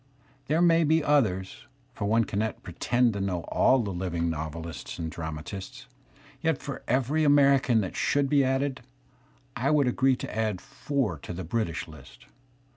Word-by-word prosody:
There 160 Hz, +4 st, +2 dB
may 165 Hz, -1 st, +5 dB
be 160 Hz, +1 st, +3 dB
others, 110 Hz, -10 st, 0 dB, 0.3 s
for 105 Hz, -, -4 dB
one 110 Hz, +3 st, +3 dB
cannot 110 Hz, +1 st, -3 dB
pretend 120 Hz, +7 st, +1 dB
to 100 Hz, -, -3 dB
know 90 Hz, -3 st, -1 dB
all 130 Hz, -, +4 dB
the 100 Hz, -, -3 dB
living 85 Hz, -2 st, -2 dB
novelists 80 Hz, +1 st, -6 dB
and 80 Hz, -2 st, -4 dB
dramatists. 85 Hz, -, -7 dB, 0.6 s
Yet 160 Hz, -3 st, +1 dB
for 140 Hz, -3 st, -6 dB
every 135 Hz, +5 st, +1 dB
American 140 Hz, -4 st, +4 dB
that 95 Hz, -, -5 dB
should 145 Hz, -1 st, +1 dB
be 140 Hz, 0 st, +3 dB
added, 135 Hz, 0 st, 0 dB, 0.7 s
I 135 Hz, +1 st, 0 dB
would 150 Hz, -3 st, +3 dB
agree 130 Hz, +1 st, +3 dB
to -, -, -7 dB
add 110 Hz, -4 st, -1 dB
four 135 Hz, -, -3 dB
to 90 Hz, -, -7 dB
the 95 Hz, +2 st, -5 dB
British 85 Hz, -3 st, -2 dB
list. 70 Hz, -6 st, -14 dB
115 Hz, 160 wpm, -27 LUFS, 90-140 Hz, 0.7 s, may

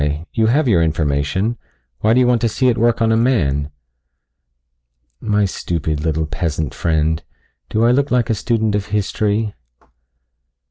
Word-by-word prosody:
You 110 Hz, -2 st, +2 dB
have 140 Hz, +5 st, +2 dB
your 95 Hz, -8 st, +4 dB
information. 80 Hz, +7 st, 0 dB, 0.4 s
Why 110 Hz, +2 st, +3 dB
do -, -, +4 dB
you 125 Hz, -, +4 dB
want 120 Hz, -2 st, +2 dB
to 115 Hz, -, +2 dB
see 130 Hz, +4 st, +1 dB
it 120 Hz, -, 0 dB
work 115 Hz, 0 st, +2 dB
on 115 Hz, -, +2 dB
a -, -, +3 dB
man?" 75 Hz, -, +1 dB, 1.5 s
"My 105 Hz, -2 st, +1 dB
stupid, 80 Hz, -5 st, -3 dB
little 80 Hz, 0 st, -1 dB
peasant 80 Hz, -2 st, -3 dB
friend, 80 Hz, -1 st, 0 dB, 0.5 s
do 110 Hz, +2 st, +1 dB
I 120 Hz, -, +5 dB
look 140 Hz, +3 st, +1 dB
like 125 Hz, -2 st, +1 dB
a -, -, +3 dB
student 110 Hz, 0 st, 0 dB
of 105 Hz, 0 st, -1 dB
history?" 105 Hz, +1 st, -1 dB
105 Hz, 155 wpm, -18 LUFS, 80-115 Hz, 1.5 s, I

